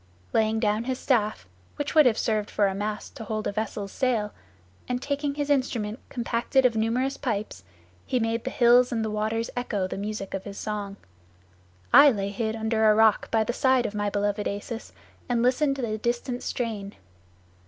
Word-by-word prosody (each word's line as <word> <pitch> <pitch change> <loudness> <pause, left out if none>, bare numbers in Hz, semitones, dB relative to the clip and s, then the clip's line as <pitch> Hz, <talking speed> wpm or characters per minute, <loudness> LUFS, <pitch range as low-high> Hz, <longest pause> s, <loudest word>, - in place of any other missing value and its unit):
Laying 220 0 +2
down 215 +1 0
his 260 0 -2
staff, 215 - 0 0.3
which 290 0 -3
would 305 -4 +7
have 230 -2 +2
served 215 -2 0
for 205 - +2
a 195 - +1
mast 210 +2 -4
to - - -6
hold 215 0 -3
a - - 0
vessel's 205 -1 -4
sail, 230 -6 0 0.5
and 250 0 -1
taking 280 +1 -2
his 290 0 -1
instrument 240 -5 0
compacted 245 +2 0
of 240 -2 +3
numerous 235 +5 0
pipes, 205 - -3 0.4
he 255 - 0
made 225 0 -1
the 260 - -2
hills 245 0 +5
and 225 -2 -1
the 215 - -2
waters 220 +2 -1
echo 220 -6 -1
the 185 - -5
music 205 -1 -5
of 195 - -3
his 200 -1 -8
song. 205 -2 -4 1.0
I 290 - +10
lay 200 -6 -1
hid 220 +2 -2
under 220 0 +2
a 210 - +5
rock 220 -1 +4
by 225 -1 +2
the 240 - -2
side 260 -1 +3
of 205 - -3
my 205 0 -1
beloved 205 +1 -1
Acis, 215 +3 -5 0.4
and 240 -1 +1
listened 275 +3 +2
to 270 - -4
the 215 -2 -2
distant 240 +2 -2
strain. 215 -5 -4
225 Hz, 190 wpm, -26 LUFS, 210-250 Hz, 1.0 s, I